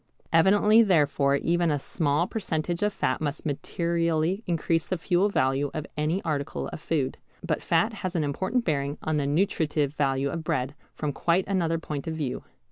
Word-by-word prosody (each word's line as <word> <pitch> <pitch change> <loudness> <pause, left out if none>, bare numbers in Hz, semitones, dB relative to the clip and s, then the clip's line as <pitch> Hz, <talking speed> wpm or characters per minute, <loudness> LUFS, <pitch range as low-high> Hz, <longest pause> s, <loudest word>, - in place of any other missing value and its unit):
Evidently 205 +6 +6
therefore 145 -8 +3
even 170 +4 +1
a 145 - +1
small 150 +2 0
percentage 175 -5 -2
of 210 0 +2
fat 130 - -1
must 150 +1 -3
materially 170 +4 0
increase 165 -1 0
the 185 - -1
fuel 180 +4 +2
value 135 -4 +1
of 155 - -3
any 155 +6 0
article 145 -3 -2
of - - -7
food. 140 -5 -1 0.3
But 155 -3 -1
fat 170 +7 +2
has 185 -1 -3
an 165 - +1
important 190 - -1
bearing 140 -2 -1
on 155 -1 0
the 140 -1 0
nutritive 150 -3 +1
value 140 -1 0
of 165 +1 -4
bread 130 -2 -1 0.2
from 150 -2 -2
quite 175 +5 +1
another 170 -4 +1
point 150 -3 -5
of 160 - -2
view. 145 -5 -3
160 Hz, 175 wpm, -26 LUFS, 145-175 Hz, 0.3 s, Evidently